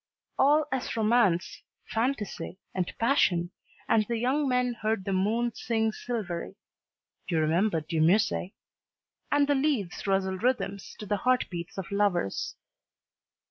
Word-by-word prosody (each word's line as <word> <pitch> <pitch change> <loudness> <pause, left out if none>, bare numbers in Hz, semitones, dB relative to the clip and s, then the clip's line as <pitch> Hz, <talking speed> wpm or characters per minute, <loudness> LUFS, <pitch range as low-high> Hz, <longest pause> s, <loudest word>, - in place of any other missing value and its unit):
All 295 +3 +5
was 265 -3 -2
romance, 210 -5 +2 0.3
fantasy, 225 -5 -2 0.2
and 180 -2 -1
passion, 190 -8 +2 0.4
and 220 - +4
the 235 - -1
young 270 +5 +1
men 250 -1 +1
heard 220 -4 -2
the 195 - -1
moon 220 +5 +1
sing 225 -1 0
silvery 205 -6 -4 0.7
you 170 - 0
remember 165 +3 +2
De 160 +1 -3
Musset! 185 +3 +3 0.8
and 290 0 +4
the 290 - +3
leaves 265 - -1
rustle 190 -1 +1
rhythms 210 -5 -1
to 210 - -7
the 205 0 0
heart 255 +5 +2
beats 175 +2 -6
of 190 -1 -5
lovers. 200 - 0
215 Hz, 135 wpm, -28 LUFS, 185-245 Hz, 0.8 s, All